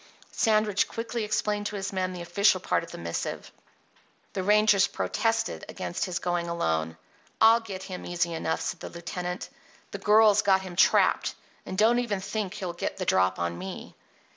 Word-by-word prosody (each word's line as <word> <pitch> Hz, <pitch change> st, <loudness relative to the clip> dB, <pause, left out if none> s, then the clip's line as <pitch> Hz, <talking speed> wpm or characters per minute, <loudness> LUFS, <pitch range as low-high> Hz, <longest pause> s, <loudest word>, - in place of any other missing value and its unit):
Sandridge 215 Hz, -2 st, +2 dB
quickly 230 Hz, 0 st, -4 dB
explained 210 Hz, -1 st, -1 dB
to 210 Hz, -, -6 dB
his 195 Hz, 0 st, -4 dB
men 185 Hz, -1 st, -1 dB
the 180 Hz, -1 st, -6 dB
official 200 Hz, +2 st, +3 dB
part 180 Hz, -, 0 dB
of 165 Hz, -, -10 dB
the -, -, -9 dB
missive. 85 Hz, 0 st, -4 dB, 0.8 s
The 190 Hz, -, -2 dB
rangers 205 Hz, 0 st, +4 dB
protested 225 Hz, 0 st, -1 dB
against 175 Hz, -, -3 dB
his 180 Hz, -3 st, -3 dB
going 175 Hz, -1 st, -1 dB
alone. 80 Hz, -, -1 dB, 0.4 s
"I'll 225 Hz, +1 st, +7 dB
get 195 Hz, -5 st, -7 dB
him 185 Hz, -1 st, -7 dB
easy 170 Hz, -1 st, -1 dB
enough," 160 Hz, 0 st, -2 dB
said -, -, -3 dB
the -, -, -7 dB
lieutenant. 180 Hz, +1 st, -5 dB, 0.4 s
"The -, -, -5 dB
girl's 210 Hz, 0 st, +5 dB
got 195 Hz, -2 st, +3 dB
him 185 Hz, -2 st, -8 dB
trapped. 185 Hz, -, +3 dB, 0.3 s
And 185 Hz, -, -5 dB
don't 225 Hz, +4 st, +4 dB
even 225 Hz, -5 st, -1 dB
think 200 Hz, 0 st, -4 dB
he'll 180 Hz, -3 st, -4 dB
get 175 Hz, -, -4 dB
the 185 Hz, -, -3 dB
drop 95 Hz, -, +2 dB
on 85 Hz, 0 st, -3 dB
me." 95 Hz, +1 st, -8 dB
190 Hz, 175 wpm, -27 LUFS, 170-210 Hz, 0.8 s, I'll